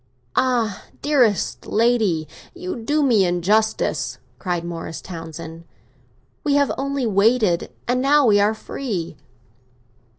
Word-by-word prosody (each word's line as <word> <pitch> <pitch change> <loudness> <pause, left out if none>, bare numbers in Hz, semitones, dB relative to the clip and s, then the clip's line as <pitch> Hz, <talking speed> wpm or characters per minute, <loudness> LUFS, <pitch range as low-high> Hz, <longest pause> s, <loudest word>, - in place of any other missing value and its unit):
"Ah, 240 -6 +1 0.2
dearest 255 -9 +1
lady, 215 -9 +2 0.3
you 365 +1 -5
do 290 +6 0
me 230 -8 +4
injustice!" 195 +5 +1 0.2
cried 175 -3 -2
Morris 165 -2 -5
Townsend. 165 -1 -8 0.8
"We 285 -1 +2
have 285 -1 +3
only 275 -1 -2
waited, 210 -3 +2 0.2
and 250 +1 +1
now 285 +1 +4
we 205 -3 +5
are 210 +2 +3
free." 215 - -4
220 Hz, 110 wpm, -22 LUFS, 175-260 Hz, 0.8 s, we